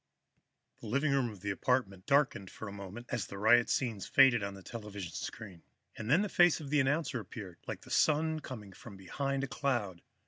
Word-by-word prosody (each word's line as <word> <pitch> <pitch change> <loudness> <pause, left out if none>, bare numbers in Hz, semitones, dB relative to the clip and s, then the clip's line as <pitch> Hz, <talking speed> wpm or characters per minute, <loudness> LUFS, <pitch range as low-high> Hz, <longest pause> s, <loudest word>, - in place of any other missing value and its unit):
The - - -9
living 140 +6 +1
room 135 -3 +2
of 105 -4 -11
the 100 0 -2
apartment 100 -4 -1
darkened 140 -9 +2
for 110 - -8
a - - -6
moment 100 +4 -8
as 115 -8 -2
the 100 - -8
riot 115 +4 +5
scenes 115 -7 -1
faded 135 -4 +6
on 100 0 -4
the 95 - -12
television 105 -6 -7
screen, 95 -6 -7 0.3
and 110 0 -6
then 165 +9 +5
the - - -1
face 175 -3 +4
of 145 -3 -8
the 150 - +4
announcer 140 -1 +1
appeared, 95 -3 -9
like - - -5
the - - -13
Sun 155 +1 +2
coming 110 -9 -9
from 100 +1 -12
behind 135 +9 -2
a - - -1
cloud. 120 -11 -2
120 Hz, 205 wpm, -32 LUFS, 100-140 Hz, 0.3 s, faded